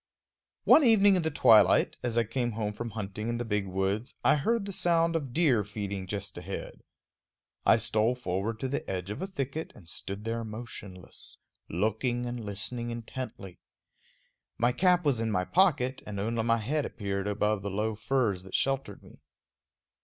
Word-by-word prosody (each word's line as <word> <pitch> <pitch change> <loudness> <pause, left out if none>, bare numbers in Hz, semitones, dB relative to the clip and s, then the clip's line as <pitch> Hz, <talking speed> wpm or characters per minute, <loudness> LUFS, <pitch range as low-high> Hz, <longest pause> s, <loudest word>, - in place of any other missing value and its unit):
One 310 - +7
evening 205 -5 +6
in 180 - +2
the 160 - 0
twilight, 105 - +5
as 120 -1 -2
I 115 - +4
came 120 +1 -2
home 105 -1 -2
from 120 +2 -5
hunting 105 +1 -5
in 120 - -1
the 120 - -3
big 105 -3 -1
woods, 95 +5 -2
I - - +6
heard 215 +9 0
the 200 - -5
sound 170 -1 +2
of 140 -6 -2
deer 135 -8 +3
feeding 100 -2 -5
just 100 +1 -4
ahead. - - -7 0.9
I - - +7
stole 110 +1 +1
forward 110 -1 -3
to 130 - -1
the 135 - -3
edge 95 +1 -3
of 105 - -6
a 190 - -2
thicket 160 -4 -4
and 90 - -16
stood 100 +4 -5
there 115 0 -2
motionless, 105 -4 -9 0.3
looking 110 +7 0
and 120 -1 -4
listening 115 +4 -3
intently. 115 -5 -7 1.0
My 120 +1 +3
cap 180 +3 +3
was 135 -6 +2
in 115 0 -1
my 90 -4 0
pocket, 140 - +2
and 100 -2 -5
only 115 +3 -1
my 115 +1 +2
head 140 +7 -1
appeared 100 -4 -3
above 105 0 0
the 100 - -3
low 105 +3 -1
firs 110 -3 0
that 95 0 -7
sheltered 135 -7 -1
me. - - -16
115 Hz, 175 wpm, -29 LUFS, 100-130 Hz, 1.0 s, One